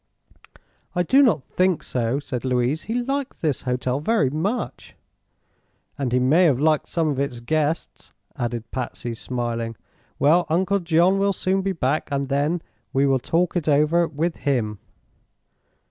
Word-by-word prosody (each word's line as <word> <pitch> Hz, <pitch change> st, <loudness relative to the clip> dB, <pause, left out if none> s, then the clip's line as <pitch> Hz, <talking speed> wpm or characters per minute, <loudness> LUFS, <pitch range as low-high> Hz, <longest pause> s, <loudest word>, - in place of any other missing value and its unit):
"I 180 Hz, -, +2 dB
do 270 Hz, +11 st, +5 dB
not 180 Hz, -, +3 dB
think 185 Hz, +3 st, 0 dB
so," 125 Hz, +2 st, -1 dB
said 130 Hz, -4 st, -5 dB
Louise. 130 Hz, +4 st, 0 dB
"He 225 Hz, -, -3 dB
liked 275 Hz, -2 st, -3 dB
this 150 Hz, -5 st, 0 dB
hotel 125 Hz, +1 st, -1 dB
very 150 Hz, -, +1 dB
much." 195 Hz, -, -3 dB, 1.0 s
"And 135 Hz, -4 st, -2 dB
he 125 Hz, -, +3 dB
may 145 Hz, +8 st, +4 dB
have 140 Hz, -6 st, +3 dB
liked 155 Hz, 0 st, +2 dB
some 165 Hz, -3 st, 0 dB
of 140 Hz, -2 st, -2 dB
its 140 Hz, -4 st, -2 dB
guests," 155 Hz, +6 st, -2 dB, 0.2 s
added 120 Hz, -1 st, -4 dB
Patsy, 120 Hz, -2 st, -3 dB
smiling. 115 Hz, -1 st, -3 dB, 0.4 s
"Well, 165 Hz, +4 st, +3 dB
Uncle 190 Hz, +5 st, +2 dB
John 175 Hz, +2 st, +3 dB
will 200 Hz, 0 st, +2 dB
soon 190 Hz, +1 st, 0 dB
be 195 Hz, 0 st, -1 dB
back, 150 Hz, -2 st, -1 dB
and 140 Hz, -1 st, -1 dB
then 150 Hz, +5 st, 0 dB, 0.3 s
we 135 Hz, +1 st, +3 dB
will 135 Hz, -1 st, +3 dB
talk 170 Hz, +8 st, 0 dB
it 165 Hz, -3 st, 0 dB
over 150 Hz, +4 st, +3 dB
with 160 Hz, +3 st, -2 dB
him." 115 Hz, -8 st, -1 dB
150 Hz, 155 wpm, -23 LUFS, 130-175 Hz, 1.0 s, do